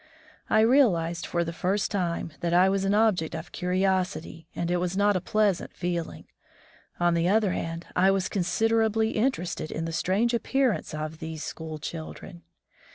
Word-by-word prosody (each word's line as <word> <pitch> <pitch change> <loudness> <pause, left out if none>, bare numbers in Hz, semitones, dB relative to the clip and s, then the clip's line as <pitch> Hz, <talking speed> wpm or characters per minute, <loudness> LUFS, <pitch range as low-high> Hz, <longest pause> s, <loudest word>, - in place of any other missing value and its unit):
I 220 - +4
realized 180 -9 +3
for 170 -1 0
the 165 0 -5
first 190 +4 -1
time 170 -5 -2
that 170 0 0
I 185 +2 +6
was 195 0 0
an 200 +1 +2
object 210 -7 +2
of - - -7
curiosity, 185 -3 -1
and 170 0 -2
it 180 - +2
was 180 +1 -2
not 205 0 +3
a 185 - 0
pleasant 205 -1 0
feeling. 175 -2 -3 0.7
On 175 0 +3
the 170 0 +1
other 210 -1 +3
hand, 165 -1 -4
I 185 +2 +4
was 195 -1 +1
consider 225 +4 +1
ably 220 0 +1
interested 215 -9 -1
in 165 - -3
the 165 - -4
strange 205 +8 +1
appearance 240 - 0
of 155 +1 -5
these 160 -1 -6
school 160 -1 -6
children. 155 - -8
180 Hz, 170 wpm, -27 LUFS, 170-210 Hz, 0.7 s, I